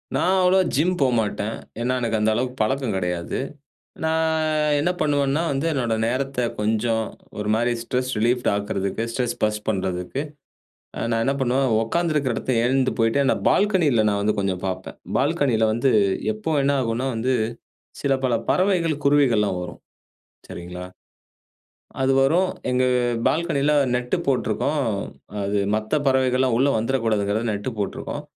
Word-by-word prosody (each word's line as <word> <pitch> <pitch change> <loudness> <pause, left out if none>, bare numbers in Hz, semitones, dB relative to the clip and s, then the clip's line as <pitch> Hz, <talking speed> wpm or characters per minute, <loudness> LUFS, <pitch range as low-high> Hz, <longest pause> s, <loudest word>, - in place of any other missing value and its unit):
நான் 185 +2 +2
அவ்ளோவா 185 +1 +5
ஜிம் 165 +7 +2
போமாட்டன். 115 -4 0 0.2
ஏன்னா, 125 +2 0
எனக்கு 115 -2 0
அந்த 105 +1 +2
அளவுக்கு 125 +2 -2
பழக்கம் 130 0 0
கிடையாது. 90 -2 -2 0.6
நான் 160 -1 +1
என்ன 155 +5 +1
பண்ணுவன்னா, 145 0 +1
வந்து 140 +3 -1
என்னோட 120 -6 0
நேரத்த 135 +3 -2 0.2
கொஞ்சம் 110 +1 +1 0.3
ஒரு 105 0 -2
மாரி 120 +2 +1
ஸ்ட்ரெஸ் 125 +2 -2
ரிலீஃப்ட் 120 +3 +1
ஆக்குறதுக்கு, 100 +1 -2
ஸ்ட்ரெஸ் 120 0 -1
பர்ஸ்ட் 105 0 0
பண்றதுக்கு, 95 +4 -2 0.8
அ - - -4
நான் 115 0 +1
என்ன 135 - +2
பண்ணுவன், 130 0 +1
உட்கார்ந்திருக்கிற 150 0 0
இடத்துலருந்து 130 - -2
எழுந்து 130 +1 +2
போயிட்டு, 115 +4 +2
அந்த - - +3
பால்கனில 165 - +3
நான் 100 0 0
வந்து 105 +1 0
கொஞ்சம் 95 -2 -1
பாப்பேன். 95 0 -5 0.2
பால்கனில 140 -6 +2
வந்து, 120 +4 +2 0.4
எப்போ 110 +9 -3
என்ன 140 +1 +2
ஆகும்னா 120 +2 -1
வந்து, 125 +4 0 0.7
சில 140 -1 +2
பல 125 - +1 0.2
பறவைகள், 180 -4 +2
குருவிகள்லாம் 120 -9 +3
வரும். 90 -1 -8 0.7
சரிங்களா? 90 +1 -7 1.2
அது 135 0 +3
வரும். 175 +7 +3 0.2
எங்க 125 0 +2 0.5
பால்கனில 150 -3 +1 0.2
நெட்டு 125 +7 -1
போட்ருக்கோம். 140 +2 0 0.6
அது 100 +1 -1 0.2
மத்த 110 +8 -1
பறவைகள்லாம் 130 -1 +2
உள்ள 140 +2 +4
வந்துறக்கூடாதுங்குறதுக்காகதான் 110 -2 0
நெட்டு 105 +5 -4
போட்ருக்கோம். 100 - -4
125 Hz, 135 wpm, -23 LUFS, 110-140 Hz, 1.2 s, அவ்ளோவா